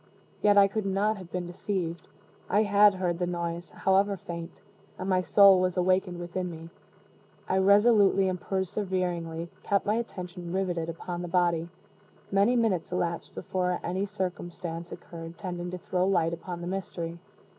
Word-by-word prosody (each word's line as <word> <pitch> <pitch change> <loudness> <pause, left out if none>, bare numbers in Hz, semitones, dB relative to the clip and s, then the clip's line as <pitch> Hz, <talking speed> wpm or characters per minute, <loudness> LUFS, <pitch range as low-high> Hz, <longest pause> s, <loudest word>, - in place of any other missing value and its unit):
Yet 205 -1 +5
I 200 0 +8
could 205 0 -2
not 205 +3 +1
have 185 -3 -11
been 180 -1 -3
deceived. 175 -1 -4 0.4
I 205 +3 +4
had 205 -1 +5
heard 180 -2 -1
the 180 - 0
noise, 170 0 -3
however 195 +1 +2
faint, 170 -1 -6 0.5
and 185 - -5
my 185 -1 +3
soul 195 0 +7
was 185 0 0
awakened 185 0 +2
within 175 +1 -4
me. 165 0 -9 0.8
I 190 - +2
resolutely 200 -1 +5
and 185 -1 -2
perseveringly 180 -4 -2
kept 200 -1 +1
my 210 - +2
attention 180 -6 -5
riveted 175 -4 -1
upon 175 +1 -5
the 175 - -4
body. 170 -1 +1 0.6
Many 200 +5 +4
minutes 215 -9 +1
elapsed 170 -1 -2
before 180 -1 -1
any 190 +3 -1
circumstance 175 -3 -5
occurred 165 0 -9
tending 180 -2 -5
to 180 - -5
throw 180 +1 0
light 170 -4 +2
upon 175 +1 -6
the 175 - -5
mystery. 170 -3 -4
180 Hz, 155 wpm, -28 LUFS, 175-195 Hz, 0.8 s, I